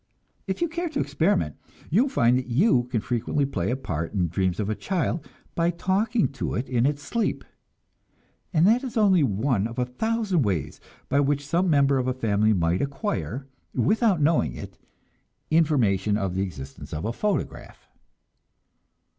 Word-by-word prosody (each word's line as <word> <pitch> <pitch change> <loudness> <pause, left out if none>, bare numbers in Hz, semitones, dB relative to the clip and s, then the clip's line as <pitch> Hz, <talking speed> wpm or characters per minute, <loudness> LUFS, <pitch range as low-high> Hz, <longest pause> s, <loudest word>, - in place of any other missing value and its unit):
If 190 - -3
you - - +2
care 340 +1 -3
to 290 - -3
experiment, 155 - 0 0.3
you 195 +9 +5
will 275 - +1
find 120 - +3
that 130 - -6
you 125 - +3
can 125 -3 -2
frequently 125 +5 -1
play 95 -9 -2
a 125 - +1
part 85 - -4
in 95 -4 +1
the 85 - 0
dreams 95 +2 -1
of 105 - -1
a 110 - 0
child 170 - -2 0.3
by 170 0 +1
talking 195 +6 +1
to 135 -2 -4
it 125 - -2
in 125 0 +2
its 145 0 -2
sleep; 235 -1 -1 1.1
and 165 -1 +3
that 235 +6 +4
is 250 -3 -5
only 195 -5 +5
one 110 -2 +1
of 115 - -10
a 125 - +1
thousand 215 - -1
different 135 - +2
ways 80 -6 -2 0.3
by 140 - +2
which 145 0 +1
some 175 +5 +1
member 140 -3 +4
of 130 - -1
a 130 - 0
family 110 -3 +2
might 85 -2 +1
acquire, 140 - -3 0.3
without 200 - +2
knowing 145 - +2
it, - - -8 0.8
information 115 - +2
of 95 -4 -2
the 95 - -1
existence 70 -8 -7
of 75 - -4
a 115 - -1
photograph. 210 - -3
135 Hz, 180 wpm, -25 LUFS, -, 1.1 s, you